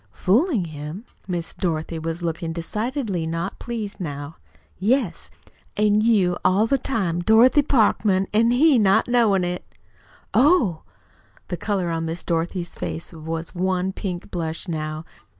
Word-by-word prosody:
"Fooling 230 - +2
him?" 155 +6 -7 0.2
Miss 175 -2 -3
Dorothy 165 -2 -2
was 165 +2 -4
looking 165 0 -2
decidedly 210 - -2
not 165 +4 -3
pleased 220 -4 -5
now. 145 -2 -6 0.4
"Yes, 210 -3 0 0.5
an' 210 0 +3
you 200 -6 +3
all 195 +4 +4
the 275 +4 +1
time 195 -10 -1
Dorothy 225 +9 +5
Parkman, 210 -7 +2
an' 225 +2 +4
he 265 +2 +5
not 200 +1 +3
knowin' 225 -6 +3
it." 180 0 -3 0.7
"Oh!" 250 - +4 0.7
The 175 - -3
color 190 -4 -1
on 165 0 -2
Miss 165 +2 -4
Dorothy's 170 +1 -2
face 165 - -5
was 160 +1 -5
one 185 +1 0
pink 185 -2 -5
blush 165 +1 -4
now. 155 -1 -4
185 Hz, 135 wpm, -23 LUFS, 165-220 Hz, 0.7 s, Dorothy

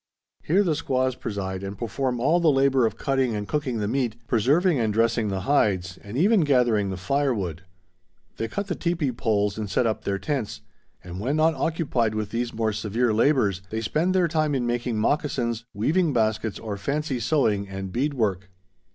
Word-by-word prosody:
Here 190 +6 +2
the 170 -5 +1
squaws 130 -3 0
preside 95 -5 -4
and 100 0 -6
perform 125 +2 -2
all 155 +8 +3
the 170 -2 +4
labor 135 -3 +3
of 110 - -6
cutting 135 -4 0
and 105 -1 -4
cooking 145 -6 -1
the 105 -1 -1
meat, 120 -2 -1
preserving 145 - +2
and 110 -2 +1
dressing 115 +1 +1
the 95 -2 -2
hides, 95 -9 +1
and 105 +4 -7
even 205 +7 +4
gathering 120 -8 +2
the 95 - -4
firewood. 100 - -1 0.8
They 115 - -2
cut 200 - -3
the 190 - -2
teepee 170 -6 -1
poles 105 -3 0
and 105 -2 -4
set 100 - +1
up 110 -1 -1
their 100 -1 -1
tents; 135 -1 -3 0.4
and 90 +1 -7
when 130 +8 -1
not 160 +1 +3
occupied 140 -10 0
with 105 -1 -3
these 120 0 -2
more 110 -1 -1
severe 110 +3 0
labors, 110 -6 +2
they 110 +2 -3
spend 165 - 0
their 180 -2 +3
time 155 -2 0
in 125 -2 0
making 120 -1 -1
moccasins, 120 -2 0
weaving 155 - +1
baskets, 110 -2 0
or 105 -3 -5
fancy 140 +3 -2
sewing 105 -6 +1
and 95 -1 -5
bead 140 +7 -1
work. 100 -5 -1
120 Hz, 185 wpm, -25 LUFS, 105-145 Hz, 0.8 s, the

